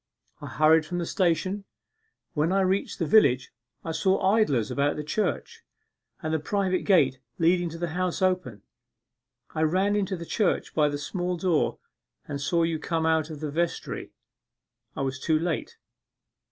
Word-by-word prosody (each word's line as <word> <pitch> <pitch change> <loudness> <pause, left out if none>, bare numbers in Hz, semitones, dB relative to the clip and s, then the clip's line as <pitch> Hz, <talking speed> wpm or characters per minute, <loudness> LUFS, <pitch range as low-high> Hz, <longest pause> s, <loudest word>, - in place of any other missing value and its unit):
I - - -6
hurried 155 +1 +4
from 175 +3 -5
the 175 - -1
station; 185 +3 0 0.7
when 155 +3 +1
I 195 +1 +3
reached 190 +1 0
the 170 - -1
village 140 - +4 0.3
I 165 - -2
saw 190 +4 +2
idlers 140 - +2
about 140 +1 +1
the 150 - -4
church, 205 +8 -2 0.6
and 155 0 -1
the 160 - +1
private 185 +3 -1
gate 135 -10 +4 0.2
leading 175 +1 +2
to 165 - -8
the 170 0 -3
House 180 +2 -2
open. 180 - -1 0.9
I 155 - -2
ran 190 +6 +2
into 195 -2 -1
the 170 - -7
church 200 +2 0
by 150 -2 +3
the 145 - -3
small 180 +4 -3
door 170 -3 +1 0.5
and 140 -1 -4
saw 170 +4 +1
you 165 -1 0
come 165 0 -1
out 160 -1 +2
of 155 -2 -8
the 150 -2 -3
vestry; 170 +3 -2 0.9
I - - -3
was 135 0 -3
too 155 +3 +2
late. 165 0 -3
165 Hz, 165 wpm, -26 LUFS, 155-185 Hz, 0.9 s, hurried